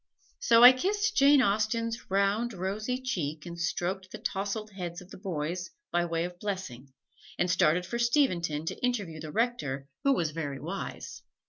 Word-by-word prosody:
So 230 0 +5
I 250 - +13
kissed 410 +10 0
Jane 280 -1 +6
Austen's 225 +2 0
round, 200 +5 +1
rosy 210 +7 -2
cheek 160 - -3
and 170 -1 -7
stroked 185 +2 -2
the - - -7
tousled 205 +2 -3
heads 175 -3 -6
of 180 +1 -15
the - - -9
boys 175 0 -3 0.2
by 175 0 +2
way 165 -1 -1
of 175 0 -6
blessing, 180 - -5 0.5
and 175 - +1
started 175 +1 +3
for 235 +6 -4
Steventon 180 - +1
to - - -5
interview 205 -11 -1
the 155 -1 -7
Rector 150 - -1 0.2
who 275 -1 +4
was 165 - 0
very 145 -4 -4
wise. - - -6
190 Hz, 165 wpm, -29 LUFS, 170-235 Hz, 0.5 s, I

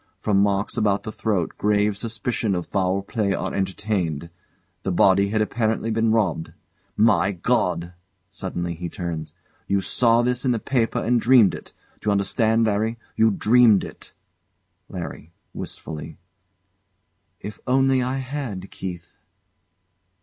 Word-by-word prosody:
From 100 -2 +1
marks 100 +2 0
about 100 -3 +1
the 110 - -5
throat 100 -7 -1
grave 105 0 +2
suspicion 110 -1 -2
of 90 - -3
foul 95 0 0
play 100 -1 -1
are - - -3
entertained. 95 -5 -2 0.5
The 95 - -2
body 95 +2 +4
had 110 +1 +1
apparently 110 0 -1
been 110 0 +2
robbed." 100 -8 0 0.4
My 105 -2 +3
God! 85 0 0 0.4
[Suddenly 90 -3 -4
he 85 +1 -6
turns] 85 -3 -5 0.3
You 100 - +2
saw 115 +3 +2
this 125 0 0
in 130 - +1
the - - 0
paper 115 0 0
and 120 0 +1
dreamed 120 -5 +6
it. - - -9 0.3
D'you 105 - -2
understand, 110 +3 +2
Larry? 110 +2 0 0.2
you 110 0 +4
dreamed 110 0 +4
it. - - -11 0.8
LARRY. 80 +3 -7 0.2
[Wistfully] 75 -2 -7 1.2
If 105 0 -8
only 135 0 +3
I 130 +1 -1
had, 130 -8 -5
Keith! 90 -2 -7
105 Hz, 135 wpm, -23 LUFS, 95-115 Hz, 1.2 s, dreamed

